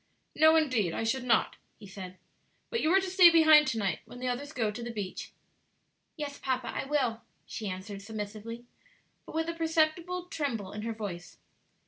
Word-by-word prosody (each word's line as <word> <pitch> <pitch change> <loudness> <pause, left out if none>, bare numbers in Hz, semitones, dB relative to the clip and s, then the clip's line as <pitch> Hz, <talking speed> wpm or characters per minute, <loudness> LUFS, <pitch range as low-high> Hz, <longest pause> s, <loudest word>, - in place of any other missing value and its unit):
"No, 315 +1 +6
indeed, 255 - +2
I - - -2
should 250 +3 -1
not," 235 -3 +2 0.2
he - - -13
said; 190 -2 -9 0.5
"but 465 - 0
you 310 - +2
are 380 - +6
to 380 - -3
stay 365 -1 +8
behind 315 -3 +7
to 230 - -1
night 195 -6 -1
when - - -12
the 255 - -3
others 265 +4 -3
go 225 -7 -1
to 215 - -7
the 240 - -5
beach." 205 -5 -5 0.9
"Yes, 290 -2 -5
papa, 255 -2 -2
I - - -3
will," 260 -6 0 0.2
she 215 -3 -5
answered 195 +2 -6
submissively, 220 +2 -7 0.6
but - - -9
with 325 0 0
a 335 - -2
perceptible 330 +2 0
tremble 275 - -3
in 210 - -6
her 225 +1 -3
voice. 195 -5 -7
245 Hz, 185 wpm, -30 LUFS, 210-315 Hz, 0.9 s, stay